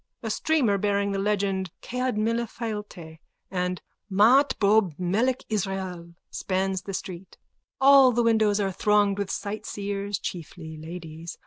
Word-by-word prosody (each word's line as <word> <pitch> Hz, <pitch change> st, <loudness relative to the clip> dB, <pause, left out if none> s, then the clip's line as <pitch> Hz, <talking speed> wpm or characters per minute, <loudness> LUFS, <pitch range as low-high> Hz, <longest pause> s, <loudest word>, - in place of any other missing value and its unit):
A 225 Hz, -, -2 dB
streamer 240 Hz, -6 st, +1 dB
bearing 200 Hz, 0 st, 0 dB
the 195 Hz, -, -1 dB
legends_ 195 Hz, -2 st, 0 dB, 0.2 s
Cead 250 Hz, -2 st, -2 dB
Mile 230 Hz, +2 st, 0 dB
Failte 210 Hz, -8 st, -7 dB, 0.3 s
and 180 Hz, -1 st, -2 dB, 0.3 s
Mah 225 Hz, +9 st, +6 dB
Ttob 205 Hz, -, +2 dB
Melek 220 Hz, +9 st, 0 dB
Israel 190 Hz, -4 st, -3 dB, 0.2 s
_spans 190 Hz, 0 st, -2 dB
the 195 Hz, -, -5 dB
street. 185 Hz, 0 st, -7 dB, 0.4 s
All 270 Hz, -1 st, +7 dB
the 240 Hz, 0 st, +1 dB
windows 220 Hz, -3 st, +3 dB
are 195 Hz, -2 st, 0 dB
thronged 205 Hz, +1 st, +2 dB
with 200 Hz, -1 st, -2 dB
sightseers, 200 Hz, -1 st, -4 dB
chiefly 160 Hz, -2 st, -7 dB
ladies. 160 Hz, 0 st, -8 dB
200 Hz, 130 wpm, -26 LUFS, 185-220 Hz, 0.4 s, All